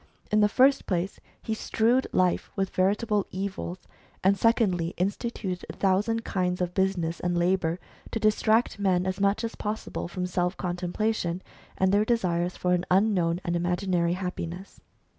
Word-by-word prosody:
In 215 - +4
the 210 0 +5
first 265 +5 +4
place, 185 0 -1 0.2
he 220 - -2
strewed 230 +3 +1
life 180 -1 +1
with 195 -1 -1
veritable 205 +2 +1
evils; 190 -1 -5 0.4
and 195 +2 +5
secondly, 190 -6 +2
instituted 195 -1 -2
a - - -5
thousand 210 +4 +1
kinds 180 -1 -1
of 180 -1 -1
business 180 -4 0
and 175 0 -1
labour, 175 -1 +1 0.3
to 225 - -2
distract 215 +1 +2
men 185 -2 +2
as 185 +1 -2
much 200 +3 +2
as 230 - -3
possible 210 -3 -4
from 180 +1 -3
self 180 0 -1
contemplation, 180 0 -2 0.3
and 190 0 +3
their 205 +1 +4
desires 180 -6 0
for 180 0 +1
an 175 -1 +1
unknown 185 -3 +2
and 175 -2 -1
imaginary 175 0 +1
happiness. 180 0 -5
185 Hz, 155 wpm, -27 LUFS, 180-210 Hz, 0.4 s, the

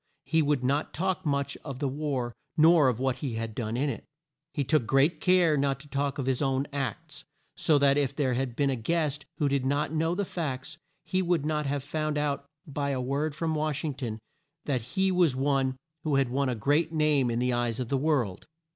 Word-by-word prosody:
He 160 0 +2
would 145 -3 +1
not 140 +4 0
talk 185 0 -1
much 140 -1 0
of 140 -4 -6
the 140 +1 -1
war 135 -4 -2 0.2
nor 160 -2 +6
of 125 -2 +1
what 130 -1 0
he 130 -6 -3
had 115 -1 -3
done 115 0 -3
in 140 +3 +1
it. 140 - -4 0.5
He 145 - -1
took 140 -5 +1
great 145 +5 +3
care 180 -4 +4
not 140 -2 +1
to 150 - -12
talk 140 0 -1
of 135 - -2
his 130 0 0
own 135 -1 +1
acts, 135 -6 -4 0.3
so 155 - +3
that 140 0 +4
if 140 -1 0
there 135 -4 +1
had 125 -1 -2
been 140 0 +2
a - - 0
guest 150 +4 -1
who 145 - +1
did 140 -1 +1
not 145 +3 0
know 165 +2 +1
the 200 +1 -1
facts, 155 -3 -4 0.3
he 185 - 0
would 170 -4 +1
not 150 -1 0
have 140 -1 -1
found 155 +1 -2
out 145 -1 -1 0.2
by 145 -1 -2
a 135 -2 -1
word 140 +4 -1
from 160 +1 -1
Wash 155 -1 -1
ing 150 - -1
ton 120 -5 -4 0.5
that 130 -4 0 0.2
he 190 0 +3
was 175 -7 +3
one 135 -1 +1 0.3
who 150 -3 +1
had 135 -2 +2
won 135 +1 0
a 125 - -1
great 145 +8 +1
name 150 -5 +2
in 115 - -1
the 125 +1 +1
eyes 120 -1 0
of 125 -2 -3
the 140 - +1
world. 130 -10 0
140 Hz, 225 wpm, -28 LUFS, 130-155 Hz, 0.5 s, nor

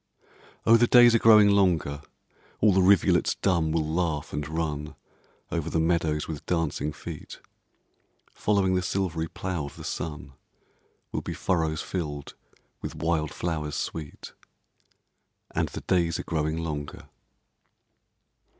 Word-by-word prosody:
Oh, 115 +1 +7
the 120 +1 +4
days 120 -1 +7
are 115 - +4
growing 110 -2 +7
longer, 85 -8 +2 0.6
All 105 -2 +4
the 95 - +4
rivulets 95 -1 +4
dumb 85 -5 +1
will 80 -1 0
laugh, 80 -2 -2
and 75 -1 -3
run 75 -2 -3 0.6
Over - - -2
the 80 - 0
meadows 80 -2 0
with 80 -3 -6
dancing 80 -3 -1
feet; 75 +1 -9 0.9
Following 100 -3 +1
the 90 - +2
silvery 90 -3 -2
plough 90 -3 -4
of 70 - -10
the - - -10
sun, 75 -4 -5 0.8
Will - - -2
be - - -5
furrows 80 -4 0
filled 75 -6 -5 0.5
with - - -6
wild 80 -2 -1
flowers 75 -4 -3
sweet: 75 -3 -6 1.2
And - - 0
the - - -7
days 85 -3 +1
are - - -5
growing 80 -1 -1
longer. 75 -3 -5
80 Hz, 130 wpm, -26 LUFS, 75-95 Hz, 1.2 s, Oh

